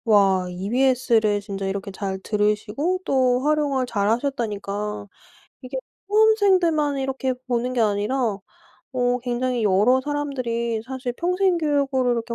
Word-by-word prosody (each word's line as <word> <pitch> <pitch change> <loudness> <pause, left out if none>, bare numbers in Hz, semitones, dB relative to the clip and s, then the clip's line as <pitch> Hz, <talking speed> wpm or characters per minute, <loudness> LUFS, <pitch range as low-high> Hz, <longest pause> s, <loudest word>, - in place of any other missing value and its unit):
와 195 -4 +3
EBS를 225 +1 +1
진짜 195 -1 -5
이렇게 195 0 -4
잘 190 -1 -4
들으시고 210 - -1
또 255 -2 +2
활용을 290 -4 +1
잘하셨다니까 210 -3 -2 0.6
이게 260 0 -6 0.3
수험생들만 375 -9 +3
이렇게 265 -1 -1
보는 250 0 -1
게 240 - +1
아니라 210 +4 0 0.8
어 250 -1 +1
굉장히 245 -1 -1
여러 210 +6 +4
사람들이 250 -6 -2
사실 255 -1 -4
평생 360 +4 +1
교육으로 280 -5 +1
이렇게 235 0 -3
250 Hz, 300 characters per minute, -23 LUFS, 210-275 Hz, 0.8 s, 여러